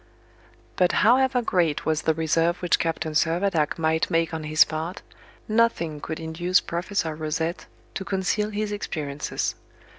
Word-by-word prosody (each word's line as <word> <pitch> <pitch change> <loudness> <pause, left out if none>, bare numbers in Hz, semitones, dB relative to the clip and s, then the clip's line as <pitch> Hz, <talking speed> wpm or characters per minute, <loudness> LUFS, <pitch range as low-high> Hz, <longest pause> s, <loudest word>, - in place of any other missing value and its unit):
But 180 -1 +3
however 250 +1 +4
great 170 -8 +1
was 155 0 +1
the 160 - +1
reserve 165 +2 +1
which 175 -2 +1
Captain 160 -1 -2
Servadac 165 0 +1
might 160 0 +1
make 165 0 +1
on 160 -1 -4
his 155 0 +5
part, 160 +4 -5 0.4
nothing 215 -9 +1
could 160 - -5
induce 170 +3 +1
Professor 170 -1 -2
Rosette 160 +2 -3 0.3
to - - -4
conceal 195 +2 -1
his 210 0 -3
experiences. 150 -8 -3
165 Hz, 140 wpm, -25 LUFS, 160-195 Hz, 0.4 s, his